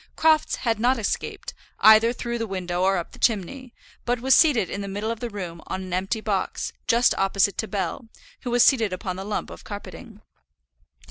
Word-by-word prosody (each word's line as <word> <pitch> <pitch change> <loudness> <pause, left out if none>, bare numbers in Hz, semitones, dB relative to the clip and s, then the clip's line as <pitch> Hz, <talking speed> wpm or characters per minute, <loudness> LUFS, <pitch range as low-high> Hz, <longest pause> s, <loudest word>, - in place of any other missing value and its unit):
Crofts 315 -1 +3
had 225 -3 -1
not 250 +3 +2
escaped, 220 - -4 0.3
either 220 +2 +7
through 235 -1 -4
the 225 - -2
window 180 -2 -3
or 190 +1 +3
up 170 - -5
the - - -15
chimney, 240 +4 -1 0.3
but 245 0 -1
was 260 +2 +3
seated 270 - +4
in 200 - -5
the 200 - -5
middle 205 +3 -3
of 230 - -5
the 240 - -4
room 180 -6 -7
on 190 - -4
an 185 -1 -7
empty 195 +5 -1
box, 200 -3 -2
just 235 +2 +4
opposite 195 0 +2
to 220 - -1
Bell, 205 +3 -4 0.3
who 250 - -5
was 240 0 +4
seated 225 -8 +3
upon 185 0 -4
the 190 - -6
lump 210 +1 -4
of - - -11
carpeting. 210 +1 -10
215 Hz, 200 wpm, -24 LUFS, 190-235 Hz, 0.3 s, either